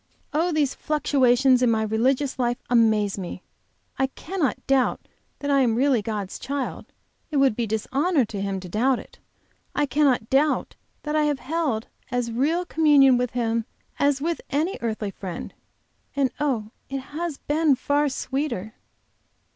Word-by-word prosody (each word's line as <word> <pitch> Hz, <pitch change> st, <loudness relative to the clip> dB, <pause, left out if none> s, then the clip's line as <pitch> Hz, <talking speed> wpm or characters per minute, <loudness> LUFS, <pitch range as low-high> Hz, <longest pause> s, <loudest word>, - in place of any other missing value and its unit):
Oh, 330 Hz, +4 st, +1 dB
these 300 Hz, -4 st, +1 dB
fluctuations 265 Hz, -4 st, +3 dB
in 250 Hz, -, +4 dB
my 220 Hz, -1 st, +2 dB
religious 255 Hz, +5 st, 0 dB
life 240 Hz, -1 st, +1 dB
amaze 215 Hz, -4 st, +3 dB
me! 180 Hz, 0 st, -6 dB, 0.6 s
I 265 Hz, -, +3 dB
cannot 320 Hz, +2 st, -3 dB
doubt 270 Hz, -2 st, +1 dB, 0.3 s
that 285 Hz, 0 st, -2 dB
I 275 Hz, -, +4 dB
am 240 Hz, -4 st, +3 dB
really 260 Hz, -2 st, +3 dB
God's 205 Hz, -3 st, -4 dB
child; 275 Hz, 0 st, -4 dB, 0.4 s
it 300 Hz, -, -1 dB
would 270 Hz, -5 st, +4 dB
be 235 Hz, -1 st, -1 dB
dishonor 270 Hz, -, +1 dB
to 205 Hz, -2 st, -5 dB
Him 195 Hz, -1 st, -2 dB
to 180 Hz, -, -8 dB
doubt 240 Hz, +8 st, +2 dB
it. -, -, -12 dB, 0.6 s
I 295 Hz, -, +2 dB
cannot 270 Hz, -4 st, +2 dB
doubt 285 Hz, +4 st, +1 dB, 0.3 s
that 300 Hz, 0 st, -2 dB
I 305 Hz, -1 st, +3 dB
have 295 Hz, -2 st, +1 dB
held 270 Hz, -6 st, -1 dB, 0.2 s
as 245 Hz, -1 st, -1 dB
real 310 Hz, +10 st, +1 dB
communion 290 Hz, -6 st, +5 dB
with 245 Hz, -1 st, -1 dB
Him 230 Hz, -2 st, 0 dB, 0.3 s
as 285 Hz, -1 st, +3 dB
with 335 Hz, +2 st, -1 dB
any 310 Hz, +7 st, -1 dB
earthly 220 Hz, -3 st, -2 dB
friend 185 Hz, -3 st, -7 dB, 0.6 s
and 275 Hz, -3 st, +1 dB
oh, 235 Hz, -8 st, -1 dB, 0.2 s
it 270 Hz, 0 st, -3 dB
has 325 Hz, -2 st, -3 dB
been 300 Hz, -1 st, +2 dB
far 290 Hz, +3 st, +1 dB
sweeter! 260 Hz, -6 st, -3 dB
265 Hz, 155 wpm, -24 LUFS, 225-290 Hz, 0.6 s, communion